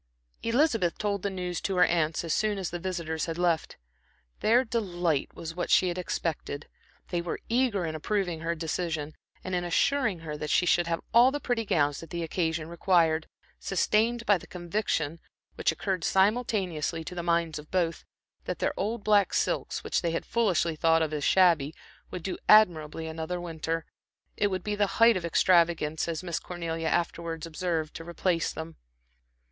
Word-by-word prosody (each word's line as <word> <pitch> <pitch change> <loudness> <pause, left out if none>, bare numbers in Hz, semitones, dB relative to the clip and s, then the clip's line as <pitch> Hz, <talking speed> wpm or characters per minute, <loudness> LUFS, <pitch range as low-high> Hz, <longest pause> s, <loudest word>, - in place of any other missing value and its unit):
Elizabeth 230 - +2
told 200 -2 -1
the 200 - -1
news 180 -2 -4
to 195 - -1
her 180 - +5
aunts 165 -2 0
as 165 -2 -1
soon 215 -1 +1
as 190 -2 -3
the 175 - -4
visitors 170 -3 -3
had 165 0 -4
left. 175 -3 0 0.6
Their 240 +4 +4
delight 175 - -1
was 165 0 -6
what 175 +1 -3
she 185 - +4
had 175 +1 -3
expected. 155 -4 -3 0.4
They 175 -1 -1
were 170 - -4
eager 230 -6 +1
in 160 - -3
approving 175 +1 -1
her 165 +1 -2
decision, 160 -2 -3 0.3
and 185 - -5
in 175 -1 0
assuring 205 +2 +1
her 155 -2 -5
that 150 0 -5
she 180 - +3
should 175 -1 +3
have 165 0 -1
all 240 +3 +7
the 290 +2 -3
pretty 240 -5 -1
gowns 145 -6 +1
that 165 - -10
the 170 +1 -3
occasion 160 -1 -1
required, 165 -2 +2 0.3
sustained 225 +5 +1
by 205 -3 +4
the - - -13
conviction, 175 -3 -2 0.3
which - - +1
occurred 190 -4 -2
simultaneously 190 -6 +1
to 180 - -7
the 175 - -3
minds 170 -2 0
of 150 - -12
both, 170 -3 0 0.4
that - - -3
their - - 0
old 215 +2 -2
black 205 -2 +3
silks, - - -1
which - - 0
they 170 - 0
had 165 - -2
foolishly 185 -8 +1
thought 165 +1 +3
of 155 -1 -3
as 150 -1 -2
shabby, 165 -6 +4 0.3
would 180 - -6
do 190 - -4
admirably 165 -7 +5
another 160 +2 -4
winter. 165 -1 -3 0.5
It 205 - +2
would 185 -2 -3
be 210 - -2
the 205 -1 +2
height 230 0 +7
of 180 -2 -2
extravagance, 170 -3 +2
as 165 +1 -3
Miss 170 -2 -2
Cornelia 165 -2 -4
afterwards 170 -1 -1
observed 165 -2 -2
to 165 - -8
replace 170 0 0
them. 160 0 -7
175 Hz, 180 wpm, -28 LUFS, 160-195 Hz, 0.6 s, all